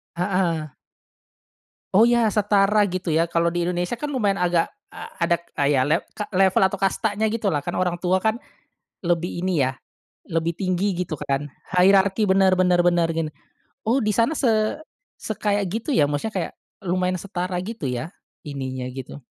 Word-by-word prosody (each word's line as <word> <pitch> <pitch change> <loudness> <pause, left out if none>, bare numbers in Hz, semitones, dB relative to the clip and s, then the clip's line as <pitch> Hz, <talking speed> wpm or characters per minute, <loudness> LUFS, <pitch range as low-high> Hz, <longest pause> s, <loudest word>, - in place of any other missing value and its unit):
Heeh. 175 -3 0 1.2
Oh 210 +4 +7
ya, 235 -2 +3
setara 205 0 +3
gitu 185 -2 -3
ya 160 +1 +3
kalau 170 0 +1
di 175 0 -1
Indonesia 180 +5 -2
kan 295 +3 -4
lumayan 205 -6 +1
agak 175 -2 +1 0.2
a - - -8 0.2
ada 170 - +3 0.2
kayak 140 -2 +3
lev 165 +3 +3
ka 210 - -4
level 190 -1 +3
atau 200 - -5
kastanya 205 +2 0
gitulah. 210 -10 -1
Kan 175 - -3
orang 180 -1 0
tua 185 +1 +1
kan 220 +2 +1 0.6
lebih 175 0 -1
ini 175 -5 +1
ya, 130 - +1 0.6
lebih 165 0 0
tinggi 185 +2 0
gitu 155 -4 -5
kan, 140 +2 -2 0.2
hierarki 195 +3 +4
bener 190 0 +5
bener 180 -1 +3
bener 175 -1 +3
gini. 165 -1 -2 0.6
Oh 250 +3 +2
di 215 - +1
sana 230 +9 +1
se 255 -5 +2 0.6
sekayak 205 -1 -1
gitu 225 +7 -4
ya 145 -6 +3
maksudnya 175 +10 -3
kayak 175 -4 -2 0.3
lumayan 185 0 0
setara 180 0 -4
gitu 220 -7 -5
ya, 125 +6 -3 0.3
ininya 130 -4 -5
gitu. 135 +1 -9
180 Hz, 160 wpm, -23 LUFS, 165-205 Hz, 1.2 s, Oh